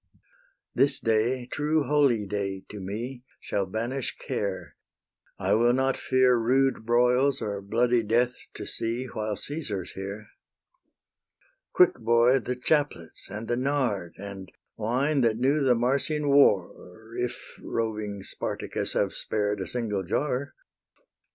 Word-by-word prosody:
This 140 0 +2
day, 115 +3 +1
true 150 +4 0
holyday 105 -10 +1
to 105 - -7
me, 115 +7 -5 0.2
Shall 100 -2 -2
banish 120 +6 -3
care: 100 -2 -4 0.6
I - - +1
will 120 +3 +4
not 130 +1 +2
fear 130 -1 +3
Rude 130 0 +1
broils 125 +3 +3
or 100 -1 -3
bloody 120 +4 +2
death 120 +3 +1 0.2
to - - -5
see, 115 +3 -2
While 110 -4 -3
Caesar's 110 - -5
here. 100 +2 -7 1.4
Quick, 180 - +4
boy, 120 +3 +4
the 125 +1 -3
chaplets 140 - -1
and 105 +3 -6
the 120 - +1
nard, 125 -10 -1
And 95 -2 -8 0.2
wine, 130 +6 +1
that 115 -2 +2
knew 135 +5 +2
the 130 -2 +4
Marsian 140 +5 0
war, 110 -5 +2
If 125 0 -5
roving 105 -3 -3
Spartacus - - -3
have - - +1
spared 105 -1 -1
A - - -4
single 110 -5 -1
jar. 135 +8 -2
120 Hz, 125 wpm, -27 LUFS, 105-130 Hz, 1.4 s, will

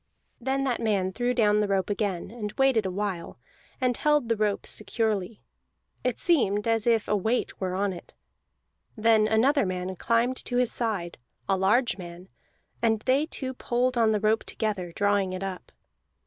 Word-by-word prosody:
Then 270 +2 -1
that 255 -3 -1
man 200 -4 +1
threw 245 +3 0
down 210 -3 +3
the 210 - +1
rope 195 -1 0
again, 200 -3 -2
and 215 -3 -5
waited 260 -6 +2
a - - -3
while, 190 - -4 0.4
and 250 -1 +1
held 295 -4 +2
the 230 - +3
rope 210 -1 -1
securely; 220 -2 -2 0.6
it 250 -2 0
seemed 210 - +2
as 225 0 +1
if 225 -2 +3
a 210 - +2
weight 220 +4 -1
were 185 -1 -1
on 195 0 0
it. 175 - -12 0.8
Then 220 -1 +4
another 255 +6 +3
man 185 0 -3
climbed 235 +6 +1
to 245 - -1
his 250 -2 +2
side, 200 - -3 0.3
a 195 - +3
large 205 +3 +2
man, 175 +1 -10 0.5
and 220 -2 +2
they 270 +6 +2
two 260 -5 -4
pulled 250 0 0
on 225 -2 +3
the 210 - +1
rope 215 +2 +2
together, 200 -5 -3
drawing 200 0 +1
it 185 +1 -4
up. 190 -2 -6
215 Hz, 175 wpm, -27 LUFS, 195-245 Hz, 0.8 s, Then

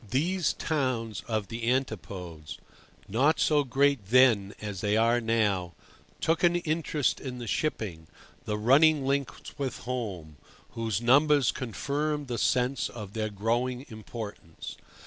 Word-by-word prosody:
These 170 - +1
towns 125 - -2
of 110 -4 -2
the 115 0 -2
Antipodes, 90 - -4 0.5
not 135 +10 +2
so 150 -2 +3
great 140 -4 +1
then 115 -4 +4
as 100 -3 -5
they 105 +1 +1
are 115 +2 +3
now, 105 -7 0 0.4
took 165 +1 +1
an 175 0 +5
interest 155 -4 0
in 130 -2 -6
the 120 - -6
shipping, 105 - -2 0.4
the 105 - -1
running 140 +6 +5
links 140 +1 -3
with 135 -4 -2
"home," 100 -12 -5 0.3
whose 115 -1 -2
numbers 140 +1 +5
confirmed 145 +3 -2
the 120 -2 -2
sense 125 +3 +1
of 105 -4 -8
their 110 -1 -2
growing 120 +5 -1
importance. 110 -6 -8
120 Hz, 130 wpm, -28 LUFS, 105-140 Hz, 0.5 s, an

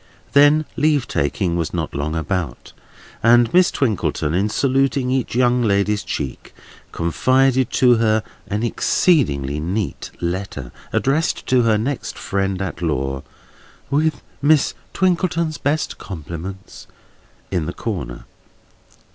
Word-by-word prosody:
Then 145 +2 +5
leave 150 -3 +2
taking 85 +5 0
was 85 0 -2
not 80 -3 -3
long 75 +3 -2
about; 80 -2 -3 0.5
and 120 +3 +5
Miss 180 0 +6
Twinkleton, 100 - -1
in 100 +4 +1
saluting 135 +1 +1
each 130 -3 -1
young 125 0 +3
lady's 105 -1 +1
cheek, 70 -3 -5 0.4
confided 130 - +2
to 125 -2 +5
her 110 -1 +2 0.2
an 105 +3 -2
exceedingly 75 - +1
neat 95 +6 -3
letter, 85 -7 -4 0.2
addressed 150 +5 0
to 130 -1 +4
her 115 -2 +3
next 130 +5 -3
friend 95 -1 -1
at 85 -2 -5
law, 70 -4 -1 0.7
"with 155 +2 +1 0.2
Miss 145 0 +3 0.2
Twinkleton's 170 -3 +1
best 150 +2 -1
compliments" 95 +2 -8 0.6
in 85 -5 -1
the - - -2
corner. 90 - -5
110 Hz, 120 wpm, -20 LUFS, 85-135 Hz, 0.7 s, Miss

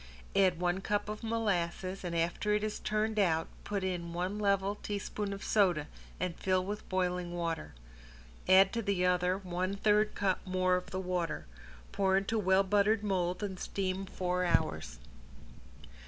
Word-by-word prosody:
Add 185 -3 +4
one 175 +1 0
cup 205 +1 -1
of 215 0 -5
molasses, 195 -5 -1
and 175 -1 -3
after 170 +5 +1
it 210 - 0
is 215 -1 -2
turned 215 0 0
out 165 -5 +2 0.2
put 200 -2 -2
in 175 -2 -3
one 185 +4 -2
level 200 -1 +2
teaspoon 205 0 -3
of 200 0 -6
soda 180 -8 +3 0.3
and 180 -1 -2
fill 185 -1 +1
with 205 +2 -5
boiling 180 -1 -1
water. 170 - -3 0.7
Add 190 +1 +7
to 230 - 0
the 195 -4 +1
other 180 0 +2
one 185 0 -2
third 210 +1 +2
cup 190 -2 +1
more 185 -1 +1
of 180 - -3
the 185 - -3
water. 180 -3 -2 0.5
Pour 190 -1 +2
into 200 +3 0
well 190 -1 +4
buttered 205 +2 +2
mold 185 -1 0
and 190 -3 -4
steam 190 0 -2
four 180 0 -1
hours. 80 - 0
190 Hz, 160 wpm, -32 LUFS, 180-205 Hz, 0.7 s, Add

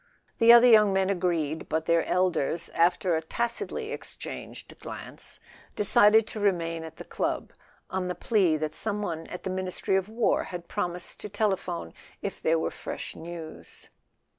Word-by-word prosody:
The 230 0 +8
other 235 +1 +9
young 215 -4 +7
men 190 0 +2
agreed, 170 -5 -1
but 160 0 -1
their 170 0 +3
elders, 170 -2 0
after 175 +1 +2
a 160 - 0
tacitly 235 - -3
exchanged - - -8
glance, - - -6 0.4
decided 210 +2 +5
to 220 - -7
remain 165 -5 0
at 160 0 -9
the - - -9
club, - - -3 0.4
on 185 0 -1
the 180 - -3
plea 180 -4 +2
that 155 0 -3
some 210 -1 -1
one 165 -4 -4
at 180 - -8
the 190 - -2
Ministry 185 0 -1
of 190 +1 0
War 225 +1 +1
had 175 -2 -7
promised 180 -4 -3
to 210 - -7
telephone 190 - -2 0.3
if - - -5
there 165 +1 +3
were 160 - -1
fresh - - -7
news. 165 -1 -9
180 Hz, 165 wpm, -27 LUFS, 165-210 Hz, 0.4 s, other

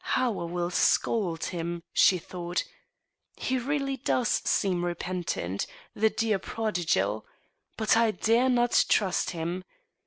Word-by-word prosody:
" - - -28
How 245 -5 +1
I 170 - -3
will 175 +1 -2
scold 180 -3 +1
him! 170 -1 -3
" - - -59
she 185 - +5
thought. 175 0 -3 0.4
" - - -53 0.3
He 260 0 -1
really 275 +1 -1
does 250 -2 0
seem 180 -3 +1
repentant, 175 - -3 0.3
the 220 +1 +3
dear 220 -2 0
prodigal! 175 - -1 0.5
But 220 -1 +3
I 230 0 +4
dare 230 +4 +2
not 240 -1 +3
trust 190 -4 +2
him. 175 +2 -3
185 Hz, 145 wpm, -28 LUFS, 175-230 Hz, 0.5 s, she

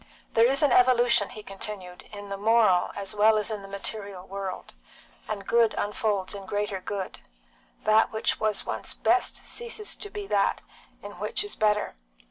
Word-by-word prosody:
"There 230 +1 +6
is 275 +3 +2
an 290 - +4
evolution," 245 -4 +5
he 215 -4 -10
continued, 195 -2 -7
"in 205 -1 -8
the 200 - -3
moral 210 -3 +4
as 200 0 -4
well 215 +1 +5
as 210 +1 -1
in 210 -2 -4
the 195 - -10
material 200 -1 -5
world, 195 -1 -6 0.5
and 205 -2 -4
good 230 -1 +3
unfolds 205 -2 -1
in 195 -1 -8
greater 205 -1 -2
good; 195 0 -5 0.6
that 215 +1 +4
which 220 - 0
was 215 -1 0
once - - -4
best 370 +2 +1
ceases 465 -3 -4
to 410 - -6
be 415 0 -6
in 395 - -11
that - - +1 0.6
which - - 0
is 415 - -5
better. 210 -1 +1
210 Hz, 170 wpm, -27 LUFS, 200-235 Hz, 0.6 s, There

